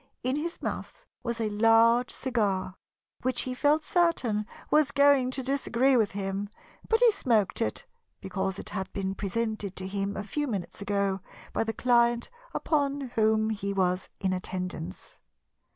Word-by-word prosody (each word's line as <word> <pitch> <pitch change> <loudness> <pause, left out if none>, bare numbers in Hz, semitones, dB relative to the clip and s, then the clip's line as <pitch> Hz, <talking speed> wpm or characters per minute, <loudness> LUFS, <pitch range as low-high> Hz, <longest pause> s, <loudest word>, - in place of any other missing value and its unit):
In 255 +2 +1
his 335 +4 -3
mouth - - -5 0.2
was 235 -2 -3
a 220 -2 0
large 230 +3 +5
cigar 205 -8 0 0.5
which 255 0 0
he 255 - -3
felt 295 +4 +2
certain 270 - +1 0.2
was 300 -2 +5
going 280 -2 +4
to 260 0 -3
disagree 265 -1 +2
with 220 -5 +3
him, 195 0 -3 0.4
but 450 - +4
he 480 -2 +7
smoked 230 - +1
it 110 - -2 0.3
because 190 0 -3
it - - -6
had 190 -2 -4
been 195 -1 -2
presented 210 -1 -2
to 185 - -4
him 200 +1 -2
a 205 - -3
few 295 +8 -2
minutes 205 -4 -4
ago 200 -1 0 0.3
by - - +1
the 225 - -2
client 240 - +2 0.2
upon 280 -4 -1
whom 220 0 +2
he 200 -2 -2
was 185 -1 0
in 190 -1 0
attendance. 180 - -5
225 Hz, 155 wpm, -28 LUFS, 195-260 Hz, 0.5 s, he